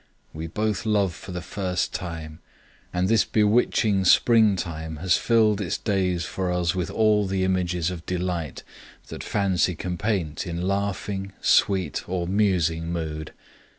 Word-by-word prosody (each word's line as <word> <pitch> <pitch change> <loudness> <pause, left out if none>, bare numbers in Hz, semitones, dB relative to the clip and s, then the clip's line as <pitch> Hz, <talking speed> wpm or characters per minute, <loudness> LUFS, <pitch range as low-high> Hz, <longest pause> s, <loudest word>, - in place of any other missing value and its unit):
We 80 +1 -5
both 105 +5 -1
love 100 -5 +1
for 95 - -10
the 90 0 -5
first 95 -2 -2
time, 80 -2 -6 0.5
and 90 +1 0
this 110 0 +4
bewitching 105 -2 +2
springtime 90 -8 +3
has 85 +3 +2
filled 110 -3 +3
its 90 - -1
days 90 -5 0
for 95 -1 -2
us 90 -1 +1
with 90 -2 -2
all 105 -2 +2
the 95 0 0
images 90 -2 0
of 85 -2 -8
delight 90 -4 -3 0.5
that - - -7
fancy 95 -3 +1
can 90 +2 -4
paint 100 -5 -1
in 85 +1 -3
laughing, 100 0 -2
sweet, 95 -7 +2
or 90 -1 -1
musing 85 -5 +1
mood. 80 -2 -4
90 Hz, 145 wpm, -25 LUFS, 85-100 Hz, 0.5 s, this